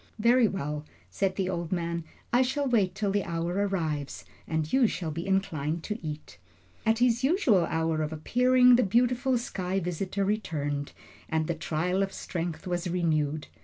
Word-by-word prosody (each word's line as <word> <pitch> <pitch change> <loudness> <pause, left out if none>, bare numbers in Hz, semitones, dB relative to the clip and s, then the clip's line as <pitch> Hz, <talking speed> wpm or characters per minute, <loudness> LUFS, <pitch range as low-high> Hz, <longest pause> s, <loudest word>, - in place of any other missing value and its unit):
"Very 235 +2 +5
well," 150 -6 -3 0.3
said 185 - 0
the 190 -2 -1
old 170 -3 -3
man, 170 -2 -1 0.3
"I 245 - +5
shall 275 +2 0
wait 205 -7 +2
till 200 0 0
the 200 0 +1
hour 170 +1 -2
arrives, 170 -8 -2 0.2
and 160 -1 -2
you 265 -3 +5
shall 170 -6 -3
be 165 +4 -5
inclined 165 -5 -1
to 210 +1 -4
eat." 150 - -7 0.5
At 225 0 +4
his 240 0 +2
usual 265 - +3
hour 160 -1 0
of 155 0 -2
appearing, 250 +9 +4
the - - +4
beautiful 245 +5 +2
sky 190 -5 -2
visitor 185 +3 -2
returned, 145 -9 -2 0.4
and 160 0 +1
the 170 - -1
trial 170 +4 -1
of 195 0 -1
strength 170 0 -4
was 175 -1 -2
renewed. 155 -4 0
180 Hz, 165 wpm, -28 LUFS, 160-220 Hz, 0.5 s, Very